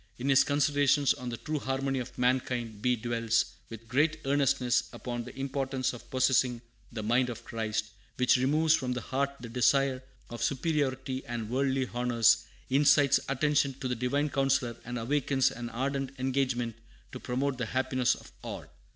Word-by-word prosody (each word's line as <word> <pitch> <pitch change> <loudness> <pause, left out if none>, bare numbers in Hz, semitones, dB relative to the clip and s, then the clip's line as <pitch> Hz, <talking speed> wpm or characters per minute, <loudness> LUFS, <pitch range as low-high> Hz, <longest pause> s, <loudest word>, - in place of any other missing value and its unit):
In 130 +3 -2
his 135 0 +6
Considerations 145 -1 +3
on 125 -1 -6
the 115 - -4
True 155 +3 -3
Harmony 135 0 -1
of 125 - -7
Mankind 125 -3 0
be 125 +1 +2
dwells 115 -1 0 0.2
with 115 0 -10
great 150 +7 +2
earnestness 135 -3 +2
upon 120 -1 -5
the - - -10
importance 135 -1 -1
of 125 - -11
possessing 130 -1 +2 0.3
"the 110 -2 -5
mind 125 +3 +2
of 120 - -7
Christ," 110 -2 -2 0.3
which 125 -1 +4
removes 150 +5 +3
from 130 -5 0
the 125 - -3
heart 140 +1 -1
the 120 - -8
desire 130 +2 +2 0.3
of 120 -1 -6
superiority 135 -1 -1
and 115 -2 -4
worldly 135 0 +1
honors, 115 -2 +3 0.2
incites 140 0 +4
attention 140 0 +1
to 130 - -4
the 125 - -1
Divine 140 +5 0
Counsellor, 135 -3 +1
and 120 +1 -4
awakens 135 +2 +1
an 120 0 -6
ardent 135 +2 -2
engagement 130 -3 -1 0.3
to 130 - -7
promote 130 +2 -2
the 120 - -2
happiness 130 0 +1
of - - -14
all. - - -6
130 Hz, 165 wpm, -29 LUFS, 120-135 Hz, 0.3 s, his